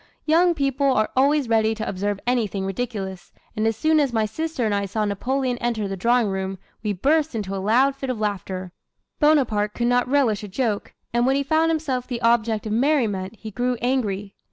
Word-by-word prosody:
Young 340 Hz, +2 st, +4 dB
people 275 Hz, -1 st, 0 dB
are 215 Hz, -4 st, +1 dB
always 280 Hz, +1 st, +3 dB
ready 220 Hz, -1 st, +2 dB
to 220 Hz, 0 st, -4 dB
observe 200 Hz, +1 st, -2 dB
anything 220 Hz, -6 st, 0 dB
ridiculous, 195 Hz, -3 st, -4 dB, 0.2 s
and 215 Hz, +1 st, +1 dB
as 225 Hz, -, +1 dB
soon 310 Hz, +4 st, +3 dB
as 280 Hz, -4 st, +2 dB
my 220 Hz, -2 st, +1 dB
sister 310 Hz, +3 st, -3 dB
and 215 Hz, -, +1 dB
I 200 Hz, 0 st, 0 dB
saw 210 Hz, +2 st, -1 dB
Napoleon 250 Hz, +5 st, -1 dB
enter 230 Hz, -4 st, -1 dB
the 195 Hz, -, -3 dB
drawing 235 Hz, +3 st, +2 dB
room, 190 Hz, 0 st, -3 dB, 0.2 s
we 210 Hz, -1 st, -1 dB
burst 290 Hz, -, +1 dB
into 200 Hz, -3 st, -3 dB
a 190 Hz, -, -3 dB
loud 255 Hz, +7 st, +3 dB
fit 270 Hz, -1 st, -5 dB
of 250 Hz, -4 st, -2 dB
laughter. 190 Hz, -3 st, -3 dB, 0.5 s
Bonaparte 240 Hz, -9 st, +2 dB
could 235 Hz, -, -1 dB
not 245 Hz, +1 st, +2 dB
relish 255 Hz, -7 st, +2 dB
a -, -, -5 dB
joke; 210 Hz, 0 st, -2 dB, 0.2 s
and 240 Hz, +1 st, +2 dB
when 265 Hz, -, +3 dB
he 280 Hz, -, +1 dB
found 315 Hz, +3 st, +2 dB
himself 290 Hz, -6 st, -1 dB
the 245 Hz, -2 st, -3 dB
object 230 Hz, -2 st, +2 dB
of 215 Hz, -, -3 dB
merriment 230 Hz, -7 st, +1 dB
he 220 Hz, 0 st, -9 dB
grew 245 Hz, +3 st, -1 dB
angry. 210 Hz, -6 st, -1 dB
230 Hz, 200 wpm, -23 LUFS, 205-270 Hz, 0.5 s, Young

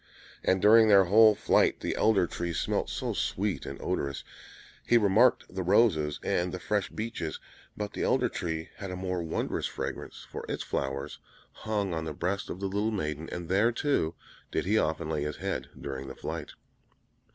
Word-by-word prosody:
And 95 Hz, +1 st, +2 dB
during 110 Hz, +1 st, +7 dB
their 100 Hz, -2 st, +7 dB
whole 110 Hz, +3 st, +7 dB
flight -, -, +2 dB
the -, -, -2 dB
Elder 105 Hz, -4 st, +3 dB
Tree 85 Hz, 0 st, -4 dB
smelt -, -, -1 dB
so -, -, -2 dB
sweet 100 Hz, 0 st, -1 dB
and 70 Hz, -, -6 dB
odorous; 70 Hz, 0 st, -2 dB, 0.6 s
he 120 Hz, -, +4 dB
remarked 110 Hz, +3 st, +4 dB
the 95 Hz, -, -2 dB
roses 90 Hz, -6 st, +3 dB
and 90 Hz, +1 st, 0 dB
the 90 Hz, -, -4 dB
fresh 105 Hz, +2 st, -1 dB
beeches, 110 Hz, -8 st, -4 dB, 0.4 s
but 105 Hz, -1 st, -4 dB
the -, -, -4 dB
Elder -, -, +2 dB
Tree 80 Hz, -1 st, -4 dB
had 95 Hz, -, -6 dB
a 90 Hz, -, -4 dB
more 90 Hz, -1 st, -2 dB
wondrous 80 Hz, -1 st, -2 dB
fragrance, -, -, -6 dB
for -, -, -7 dB
its -, -, -2 dB
flowers 70 Hz, 0 st, -3 dB, 0.3 s
hung 105 Hz, -4 st, -2 dB
on 80 Hz, -1 st, -2 dB
the 80 Hz, -, -4 dB
breast 95 Hz, +5 st, -2 dB
of 90 Hz, -, -5 dB
the 100 Hz, -, -3 dB
little 100 Hz, +3 st, 0 dB
maiden; 80 Hz, -6 st, -3 dB
and 85 Hz, -1 st, -5 dB
there, 100 Hz, +6 st, +3 dB
too, 120 Hz, -, 0 dB, 0.3 s
did -, -, -1 dB
he 105 Hz, +4 st, +2 dB
often 80 Hz, -5 st, +1 dB
lay 80 Hz, -2 st, -1 dB
his 75 Hz, 0 st, -3 dB
head -, -, -3 dB
during 70 Hz, -1 st, -5 dB
the 65 Hz, -, -8 dB
flight. -, -, -6 dB
95 Hz, 185 wpm, -29 LUFS, 80-105 Hz, 0.6 s, during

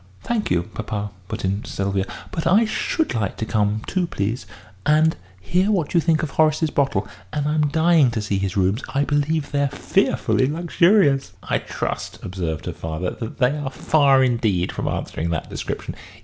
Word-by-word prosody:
"Thank 235 Hz, -3 st, -1 dB
you, 85 Hz, -1 st, +2 dB
papa," 105 Hz, -1 st, -5 dB, 0.2 s
put -, -, -4 dB
in 100 Hz, +3 st, -1 dB
Sylvia; 100 Hz, 0 st, -2 dB, 0.2 s
"but 165 Hz, -, -2 dB
I 205 Hz, +7 st, +5 dB
should 310 Hz, +8 st, -1 dB
like 100 Hz, -4 st, -2 dB
to 110 Hz, -, -2 dB
come 105 Hz, 0 st, 0 dB
too, 185 Hz, -2 st, 0 dB
please, 110 Hz, -1 st, -3 dB, 0.4 s
and 155 Hz, +2 st, +4 dB, 0.2 s
hear 180 Hz, -, +1 dB
what 180 Hz, -8 st, 0 dB
you 170 Hz, -, +5 dB
think 160 Hz, -1 st, +2 dB
of 150 Hz, -, -2 dB
Horace's 155 Hz, 0 st, +2 dB
bottle. 120 Hz, -9 st, +1 dB, 0.2 s
And 145 Hz, -1 st, -1 dB
I'm 150 Hz, 0 st, +2 dB
dying 160 Hz, -2 st, +4 dB
to 115 Hz, -2 st, -2 dB
see 100 Hz, -2 st, -1 dB
his 100 Hz, +1 st, -2 dB
rooms. 95 Hz, +5 st, +1 dB
I 140 Hz, -, +3 dB
believe 145 Hz, +1 st, 0 dB
they're 140 Hz, 0 st, +2 dB
fearfully 130 Hz, -, +1 dB
luxurious." 170 Hz, -2 st, +3 dB
"I -, -, 0 dB
trust," -, -, -4 dB
observed 85 Hz, -4 st, -4 dB
her -, -, -3 dB
father, 80 Hz, +3 st, -3 dB
"that 115 Hz, -, -6 dB
they 130 Hz, +1 st, +2 dB
are 145 Hz, -3 st, -3 dB
far 135 Hz, -1 st, +4 dB
indeed 110 Hz, -8 st, +1 dB
from -, -, -4 dB
answering 85 Hz, -, -2 dB
that 85 Hz, -2 st, -3 dB
description. -, -, -4 dB
135 Hz, 175 wpm, -22 LUFS, 100-155 Hz, 0.4 s, I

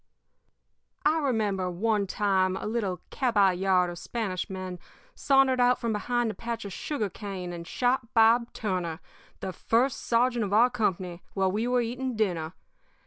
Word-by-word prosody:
"I 310 Hz, +2 st, +4 dB
remember, 210 Hz, -9 st, 0 dB
one 205 Hz, +3 st, 0 dB
time, 190 Hz, -2 st, +1 dB
a -, -, -6 dB
little 210 Hz, -5 st, -2 dB
caballard 190 Hz, -6 st, +2 dB
of 175 Hz, -, -8 dB
Spanish 205 Hz, -6 st, -3 dB
men 185 Hz, -2 st, -6 dB, 0.3 s
sauntered 270 Hz, -2 st, +3 dB
out 245 Hz, 0 st, +4 dB
from 230 Hz, -2 st, -1 dB
behind 240 Hz, +2 st, 0 dB
a -, -, -8 dB
patch 230 Hz, -1 st, -5 dB
of 200 Hz, -, -6 dB
sugar 275 Hz, -4 st, -2 dB
cane 190 Hz, -2 st, -6 dB
and 170 Hz, -1 st, -7 dB
shot 250 Hz, -1 st, 0 dB
Bob 230 Hz, +1 st, +5 dB
Turner, 180 Hz, -6 st, -3 dB, 0.4 s
the 190 Hz, -, -4 dB
first 240 Hz, +7 st, +1 dB
sergeant 240 Hz, 0 st, +2 dB
of 200 Hz, -1 st, -3 dB
our 240 Hz, +4 st, +5 dB
company, 185 Hz, -6 st, -2 dB
while 190 Hz, -1 st, +2 dB
we 220 Hz, +5 st, -1 dB
were 250 Hz, 0 st, +2 dB
eating 250 Hz, +2 st, -3 dB
dinner. 175 Hz, -7 st, -1 dB
215 Hz, 155 wpm, -27 LUFS, 185-240 Hz, 0.4 s, Bob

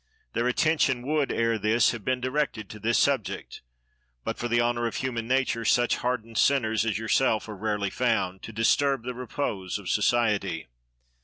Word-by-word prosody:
Their 120 Hz, -, 0 dB
attention 130 Hz, -2 st, +1 dB
would 150 Hz, -1 st, 0 dB
ere 115 Hz, -1 st, +1 dB
this 110 Hz, +3 st, +3 dB
have 115 Hz, -3 st, -7 dB
been 130 Hz, +3 st, 0 dB
directed 130 Hz, -4 st, -2 dB
to 110 Hz, -, -9 dB
this 115 Hz, +3 st, +1 dB
subject, 135 Hz, -8 st, -1 dB, 0.6 s
but, -, -, -3 dB
for 120 Hz, -, -1 dB
the 120 Hz, 0 st, +2 dB
honor 120 Hz, 0 st, +1 dB
of -, -, -5 dB
human 120 Hz, -3 st, -3 dB
nature, 130 Hz, -2 st, +1 dB
such 120 Hz, +2 st, +3 dB
hardened 115 Hz, -3 st, -2 dB
sinners 110 Hz, -6 st, +2 dB
as 110 Hz, -, 0 dB
yourself 110 Hz, 0 st, +1 dB
are 105 Hz, -, -6 dB
rarely 105 Hz, -1 st, -2 dB
found, 105 Hz, -7 st, 0 dB
to -, -, -8 dB
disturb 130 Hz, +4 st, +2 dB
the 125 Hz, +1 st, -4 dB
repose 120 Hz, -7 st, -3 dB
of 100 Hz, -3 st, -7 dB
society. 105 Hz, -, +1 dB
115 Hz, 170 wpm, -27 LUFS, 110-125 Hz, 0.6 s, this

